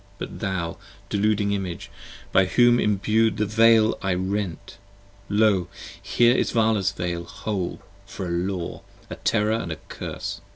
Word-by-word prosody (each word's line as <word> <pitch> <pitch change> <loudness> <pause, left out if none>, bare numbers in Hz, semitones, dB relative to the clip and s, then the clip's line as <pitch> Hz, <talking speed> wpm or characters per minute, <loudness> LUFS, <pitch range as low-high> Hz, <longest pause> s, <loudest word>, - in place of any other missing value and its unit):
But - - -7
thou, 95 -5 -2 0.3
deluding 105 0 +1
Image, 95 -4 -4 0.4
by 95 - +5
whom 120 +4 +4
imbu'd 105 +2 +2
the 105 - +1
Veil 110 +1 +4
I 95 -2 0
rent, 95 -1 -3 0.5
Lo 105 -4 +3 0.3
here 120 +1 +3
is - - +1
Vala's 110 -4 +2
Veil 90 -3 -3
whole, 110 -5 -4 0.3
for 95 -1 -6
a 85 - -4
Law, 90 0 -3 0.3
a - - -4
Terror 110 -2 0
& - - -6
a - - -2
Curse! - - -6
100 Hz, 140 wpm, -24 LUFS, 95-110 Hz, 0.5 s, by